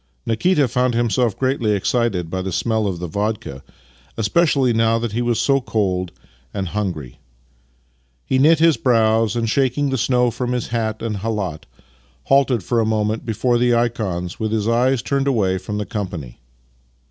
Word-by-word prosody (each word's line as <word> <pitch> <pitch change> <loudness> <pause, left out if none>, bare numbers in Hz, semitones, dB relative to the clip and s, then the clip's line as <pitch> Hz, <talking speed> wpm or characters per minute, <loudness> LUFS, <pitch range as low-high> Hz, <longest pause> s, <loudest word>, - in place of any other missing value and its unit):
Nikita 145 +6 +2
found 125 0 0
himself 120 -2 +1
greatly 130 -5 0
excited 100 -3 0
by 95 - -2
the 95 0 -4
smell 110 +3 0
of 95 -3 -2
the 90 - -5
vodka 100 -6 -3 0.3
— - - -31
especially 130 +2 +2
now 115 0 +2
that 115 -1 -3
he 115 +3 -1
was 120 -2 0
so 135 +3 +2
cold 95 -7 -1 0.4
and 95 -3 -2
hungry. 90 -12 -4 1.1
Ke 130 0 +2
knit 160 +3 +6
his 165 0 +4
brows 115 -3 +2
and, 115 -1 0
shaking 135 +3 +1
the 130 - -1
snow 125 0 +2
from 125 +2 -3
his 125 -2 -3
hat 110 -2 -2
and 110 -3 -2
khalat, 100 -6 -3 0.6
halted 135 -6 +2
for 120 +5 0
a - - +3
moment 110 +1 -1
before 120 +2 +1
the 120 0 +3
ikons, 105 -7 -2
with 110 -1 -2
his 110 -1 0
eyes 125 +2 +2
turned 140 -1 0
away 100 -8 +1
from 105 +2 -5
the 105 - -2
com 105 -2 -3
pany. 75 -10 -8
115 Hz, 175 wpm, -20 LUFS, 100-125 Hz, 1.1 s, knit